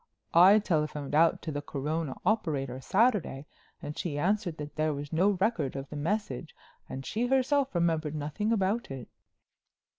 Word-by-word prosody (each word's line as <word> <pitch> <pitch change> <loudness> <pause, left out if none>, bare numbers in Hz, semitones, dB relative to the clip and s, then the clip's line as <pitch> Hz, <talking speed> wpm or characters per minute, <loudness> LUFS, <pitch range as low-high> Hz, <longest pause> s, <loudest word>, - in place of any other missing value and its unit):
I 185 +5 +8
telephoned 150 -8 -1
out 165 +2 +4
to 160 - -3
the 145 -1 -3
Corona 150 +1 -3
operator 145 - 0
Saturday 190 - +1 0.4
and 150 - -5
she 150 -5 -3
answered 185 +1 0
that 150 0 -7
there 155 -1 0
was 145 +2 -7
no 190 +4 +3
record 200 - 0
of 135 0 -5
the - - -6
message 160 - -3 0.3
and 135 0 -6
she 235 +3 -1
herself 270 -1 +2
remembered 160 -3 +1
nothing 155 +9 -2
about 215 +2 0
it." 135 -3 -7
160 Hz, 155 wpm, -29 LUFS, 145-210 Hz, 0.4 s, I